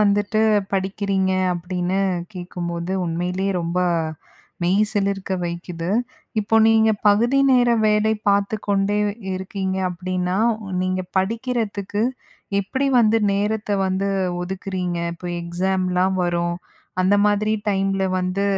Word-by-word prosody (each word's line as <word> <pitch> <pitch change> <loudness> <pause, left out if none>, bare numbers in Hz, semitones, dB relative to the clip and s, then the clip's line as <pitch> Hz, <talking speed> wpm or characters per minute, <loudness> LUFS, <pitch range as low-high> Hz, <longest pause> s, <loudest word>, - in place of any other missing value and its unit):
வந்துட்டு 205 +1 +2 0.3
படிக்கிறீங்க 190 0 0 0.2
அப்படின்னு 180 +2 -2 0.3
கேட்கும்போது, 175 -1 -4
உண்மையிலயே 180 +3 -1
ரொம்ப 170 +2 -2 0.8
மெய் 180 +3 +2
சிலிர்க்க 195 -2 -1
வைக்குது. 170 0 -5 0.5
இப்போ 220 +2 +1
நீங்க 220 0 +5 0.2
பகுதி 235 +6 +3
நேர 245 -2 +4 0.2
வேலை 210 +1 +3 0.2
பாத்து 200 +2 +2
கொண்டே 200 +1 +2 0.4
இருக்கீங்க 190 0 -3
அப்படின்னா, 180 +1 -2 0.4
நீங்க 185 0 0 0.2
படிக்கிறதுக்கு 210 -1 -1 0.6
எப்படி 260 +8 -1
வந்து 225 0 +4
நேரத்த 210 +1 -1 0.2
வந்து 190 +1 0 0.3
ஒதுக்குறீங்க? 180 -1 -3 0.2
இப்போ 175 +1 -7
எக்ஸாம்லாம் 185 +1 0
வரும் 175 0 0 0.4
அந்த 185 +2 +4
மாதிரி 210 +1 +2 0.2
டைம்ல 195 -1 +1 0.2
வந்து 185 +2 -1
190 Hz, 105 wpm, -22 LUFS, 180-205 Hz, 0.8 s, நீங்க